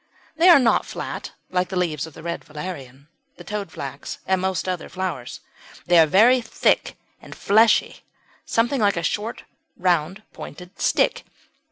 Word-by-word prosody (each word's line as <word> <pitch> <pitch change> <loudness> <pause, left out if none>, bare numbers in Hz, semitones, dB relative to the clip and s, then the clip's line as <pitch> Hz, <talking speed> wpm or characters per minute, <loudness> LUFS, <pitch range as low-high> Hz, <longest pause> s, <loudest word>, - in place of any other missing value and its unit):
They 335 +3 +5
are 345 - +10
not 250 -4 +2
flat - - -6 0.2
like 180 0 0
the 190 - -5
leaves 165 -4 -1
of 160 - -14
the 160 - -11
Red 170 0 -4
Valerian, 150 -4 -8 0.3
the - - -11
Toadflax, 160 -9 -6
and 190 -1 +1
most 190 -1 -1
other 180 -2 -3
flowers; 180 -10 -5 0.4
they 175 -1 +5
are 160 - +6
very 235 +10 +5
thick 225 - 0 0.3
and - - -11
fleshy 220 +2 +3 0.4
something 240 +3 0
like 200 -3 +2
a 170 - -2
short 215 +6 -3 0.3
round 180 +2 0
pointed 180 +4 -11
stick. - - +1
185 Hz, 155 wpm, -23 LUFS, 160-210 Hz, 0.4 s, are